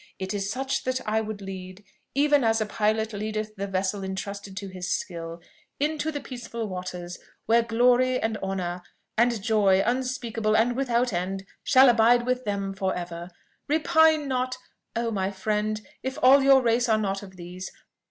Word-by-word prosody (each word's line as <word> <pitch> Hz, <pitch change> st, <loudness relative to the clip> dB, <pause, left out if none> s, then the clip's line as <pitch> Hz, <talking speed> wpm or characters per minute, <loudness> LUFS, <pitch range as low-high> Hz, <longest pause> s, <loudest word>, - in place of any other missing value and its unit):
It 190 Hz, +1 st, -4 dB
is 200 Hz, -1 st, -2 dB
such 265 Hz, +3 st, -2 dB
that 255 Hz, 0 st, 0 dB
I 220 Hz, +1 st, +2 dB
would 215 Hz, -2 st, -6 dB
lead, 190 Hz, 0 st, -8 dB, 0.3 s
even 290 Hz, -1 st, +4 dB
as 225 Hz, 0 st, +3 dB
a 215 Hz, -, 0 dB
pilot 220 Hz, +1 st, 0 dB
leadeth 215 Hz, +1 st, -3 dB
the 200 Hz, -1 st, -4 dB
vessel 195 Hz, +1 st, -1 dB
intrusted 195 Hz, +1 st, -5 dB
to 200 Hz, -1 st, -4 dB
his 185 Hz, -1 st, -6 dB
skill, 170 Hz, -1 st, -4 dB, 0.4 s
into 305 Hz, +1 st, 0 dB
the 290 Hz, -, -4 dB
peaceful 235 Hz, -4 st, -6 dB
waters, 180 Hz, -2 st, -6 dB, 0.3 s
where 230 Hz, +2 st, +4 dB
glory, 245 Hz, +2 st, +3 dB
and 225 Hz, 0 st, -1 dB
honour, 180 Hz, -3 st, -3 dB, 0.3 s
and 235 Hz, 0 st, +3 dB
joy 200 Hz, -4 st, +3 dB
unspeakable 235 Hz, -3 st, 0 dB
and 235 Hz, +2 st, +2 dB
without 245 Hz, -3 st, +1 dB
end, 190 Hz, +2 st, -2 dB, 0.2 s
shall 265 Hz, 0 st, +6 dB
abide 240 Hz, 0 st, +5 dB
with 255 Hz, 0 st, -1 dB
them 200 Hz, -1 st, -2 dB
for 190 Hz, -1 st, -1 dB
ever! 175 Hz, 0 st, -6 dB, 0.4 s
"Repine 315 Hz, 0 st, +4 dB
not, 255 Hz, -1 st, -1 dB, 0.4 s
oh! 230 Hz, 0 st, -1 dB
my 190 Hz, -3 st, -1 dB
friend, 210 Hz, +2 st, -1 dB, 0.2 s
if 265 Hz, +2 st, -4 dB
all 270 Hz, +2 st, +8 dB
your 270 Hz, -1 st, +6 dB
race 240 Hz, +1 st, +2 dB
are 220 Hz, -, +4 dB
not 195 Hz, -2 st, -1 dB
of 190 Hz, -2 st, -12 dB
these. 180 Hz, +1 st, -8 dB
215 Hz, 170 wpm, -26 LUFS, 195-250 Hz, 0.4 s, all